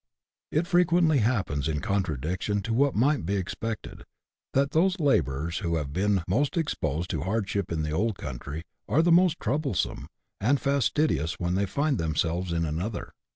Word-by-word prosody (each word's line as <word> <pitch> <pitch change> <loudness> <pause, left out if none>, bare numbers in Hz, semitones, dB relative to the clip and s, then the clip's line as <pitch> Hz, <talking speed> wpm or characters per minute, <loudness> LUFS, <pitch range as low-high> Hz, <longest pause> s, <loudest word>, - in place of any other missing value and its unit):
It 155 +3 +1
frequently 175 -4 +3
happens, 100 - 0
in 75 -2 -1
contradiction 95 - -1
to 115 - -2
what 140 +3 +2
might 140 - +2
be 100 +5 -1
ex 95 -2 -3
pected, 115 -1 -5 0.5
that 140 +1 +3
those 185 +4 +2
labourers 85 - +1
who 85 -5 -1
have 70 -3 -3
been 100 +1 +1
most 135 - +1
exposed 85 - -1
to 80 - -2
hardship 100 0 -1
in 80 -2 -1
the 75 - -2
old 100 +5 0
country 70 +4 -6 0.3
are 145 +10 +4
the 175 - +3
most 175 -1 +4
troublesome 135 - -1 0.3
and 130 +7 +2
fas 140 -3 +2
tidious 85 - +1
when 90 0 -1
they 100 +2 +1
find 140 +6 0
themselves 80 +3 -1
in 85 0 0
another. 85 +8 -4
100 Hz, 170 wpm, -27 LUFS, -, 0.5 s, are